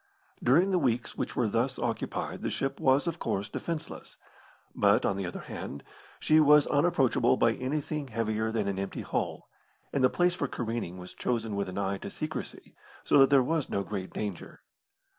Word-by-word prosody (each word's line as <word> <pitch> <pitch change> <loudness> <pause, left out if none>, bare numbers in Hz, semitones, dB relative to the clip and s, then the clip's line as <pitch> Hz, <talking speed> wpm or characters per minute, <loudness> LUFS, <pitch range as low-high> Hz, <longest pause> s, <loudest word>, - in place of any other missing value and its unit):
During 170 +10 +4
the 185 - +3
weeks 125 -5 0
which - - -3
were 120 - +2
thus 120 +5 0
occupied 115 -2 -3
the - - -1
ship 135 0 -2
was, 135 +3 +3
of 170 -1 -3
course, 100 +2 -2
defenceless; 165 -2 -6 0.6
but, - - +3
on 100 - +1
the 95 -2 -3
other - - -6
hand, 70 - -7 0.4
she 155 0 +4
was 150 -1 +6
unapproachable 145 -6 +3
by 115 - +3
anything 145 +3 -3
heavier 110 -1 -1
than 110 -3 -1
an 95 -1 -2
empty 100 - -4
hull, - - -3 0.5
and 135 - +1
the 130 - +6
place 175 +4 +2
for 145 -5 -2
careening 115 -8 -4
was 90 0 -10
chosen 115 -4 -2
with 100 -1 -2
an 95 - -6
eye 100 -1 -1
to - - -6
secrecy, - - -6 0.3
so - - +4
that 135 - +7
there 140 -2 +5
was 160 +2 -1
no 100 - -1
great 95 -1 -5
danger. 100 -5 -6
120 Hz, 185 wpm, -29 LUFS, 105-145 Hz, 0.6 s, that